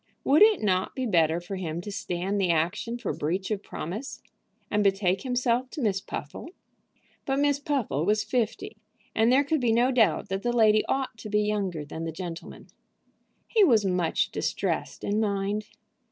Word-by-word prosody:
Would 290 +3 +4
it 430 - +6
not 185 -2 0
be 260 - -2
better 165 -6 +2
for 180 +3 -6
him 170 -3 -4
to 205 - -7
stand 195 +1 -2
the 185 - +1
action 175 +9 0
for 240 -5 -3
breach 185 +7 -2
of 205 -2 -1
promise, 210 - -6 0.5
and 210 0 +2
betake 195 -1 +2
himself 250 0 0
to 295 - -6
Miss 195 -3 +1
Puffle? 190 - -7 0.7
But 270 0 -1
Miss 285 0 +2
Puffle 270 - -1
was 210 +4 +2
fifty, 230 -2 -2 0.4
and 225 +2 +3
there 270 +3 +5
could 295 0 0
be 240 -2 +2
no 240 +3 +3
doubt 235 -5 +2
that 195 +1 -2
the 240 +2 -1
lady 215 -1 +5
ought 265 -4 -2
to 215 - -7
be 210 0 +2
younger 195 -7 -2
than 160 +3 -6
the 165 - -3
gentleman. 170 0 -8 0.8
He 440 -3 +4
was 225 - +4
much 180 -3 0
distressed - - -2
in 205 +1 0
mind. 205 0 -1
210 Hz, 180 wpm, -27 LUFS, 185-245 Hz, 0.8 s, it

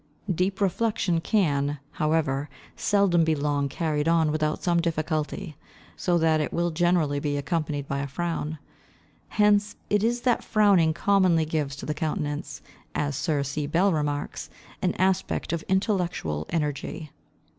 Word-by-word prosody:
Deep 185 +3 0
reflection 195 -3 +1
can, 145 -8 +1
however, 150 -2 0 0.3
seldom 200 -5 +3
be 160 -1 +2
long 145 -1 0
carried 150 0 -1
on 165 -2 +3
without 155 0 -1
some 170 -1 +2
difficulty, 155 -2 -2 0.4
so 175 -1 +1
that 160 -1 +3
it 150 - -2
will 170 0 0
generally 165 -4 +2
be 145 0 -1
accompanied 145 -2 -2
by 140 - -2
a 140 - -2
frown. 160 +1 -3 0.7
Hence 210 -1 +3 0.2
it 205 0 +3
is 240 +1 +1
that 245 -2 +1
frowning 200 -7 +4
commonly 180 -2 +3
gives 150 -3 -2
to 140 - -8
the 150 - -1
countenance, 150 -1 -3 0.3
as 145 -1 -1
Sir 140 +1 0
C. 145 +1 -3
Bell 180 +5 +3
remarks, 145 -2 -2 0.3
an 180 - 0
aspect 190 -2 0
of 170 - -1
intellectual 180 - 0
energy. 150 -1 -3
160 Hz, 145 wpm, -26 LUFS, 145-180 Hz, 0.7 s, frowning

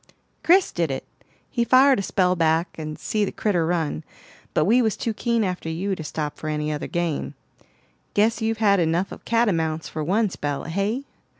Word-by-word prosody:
"Chris 370 +3 +4
did 170 -3 -1
it; 135 - -4 0.5
he 235 - +1
fired 260 +1 +5
a - - 0
spell 185 -2 +1
back 165 0 +2
and 155 -1 -6
see 215 -1 -1
the 200 - -1
critter 175 -6 0
run, 165 -2 -1 0.5
but 155 - +3
we 240 +5 +4
was 220 -3 0
too 230 - -2
keen 235 0 0
after 180 -4 -3
you 185 +5 -2
to 160 - -7
stop 150 0 -4
for 155 - -6
any 150 0 -1
other 150 - -3
game. 170 -3 -2 0.8
Guess 220 +3 +2
you've 225 0 0
had 200 -3 +4
enough 170 +3 +1
of - - -10
catamounts 165 -9 +1
for 155 - -4
one 205 +8 +2
spell, 145 -6 -3
hey?" 200 +10 -2
180 Hz, 190 wpm, -24 LUFS, 160-220 Hz, 0.8 s, fired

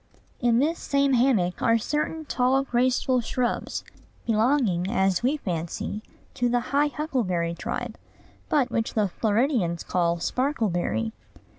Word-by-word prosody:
In 240 -2 +3
this 310 +6 +1
same 280 -1 +1
hammock 230 -9 +2
are 230 - +4
certain 300 +6 -2
tall, 265 0 +2
graceful 255 0 +1
shrubs, 240 +1 -2 0.4
belonging, 220 -5 +2
as 190 -5 +2
we 265 +5 +1
fancy, 175 - -4 0.3
to 245 -2 0
the 245 0 +2
high 290 +1 +4
huckleberry 230 - -1
tribe, 170 - -5 0.5
but 270 -5 +2
which 230 -1 -1
the 210 -2 +2
Floridians 215 - 0
call 170 -1 +1
sparkleberry. 175 - -1
240 Hz, 125 wpm, -25 LUFS, 185-270 Hz, 0.5 s, are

